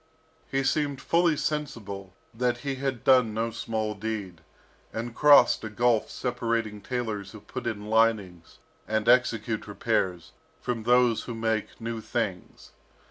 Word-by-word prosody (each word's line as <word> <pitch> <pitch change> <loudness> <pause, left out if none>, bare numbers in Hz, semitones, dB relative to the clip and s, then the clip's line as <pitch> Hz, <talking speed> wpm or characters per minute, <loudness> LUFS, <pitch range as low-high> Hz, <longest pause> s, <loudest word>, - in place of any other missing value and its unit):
He 135 0 0
seemed 140 -1 0
fully 170 -2 +2
sensible 105 -12 -4 0.2
that 120 +1 0
he 140 - 0
had 130 -3 -3
done 125 -5 +4
no 115 +1 -1
small 110 -1 -2
deed, 105 -5 -5 0.5
and 115 +1 -4
crossed 145 -4 +6
a 110 - -4
gulf 115 +1 +2
separating 115 -4 -2
tailors 110 -4 -4
who 110 - -9
put - - -6
in 105 -3 -3
linings, 105 -6 +1 0.3
and 110 0 -1
execute 115 -3 +2
repairs, 90 -3 -1 0.3
from 120 -2 -3
those 120 0 +3
who 120 - -5
make 110 -1 -2
new 115 -1 -4
things. 95 -3 -4
115 Hz, 135 wpm, -27 LUFS, 105-125 Hz, 0.5 s, crossed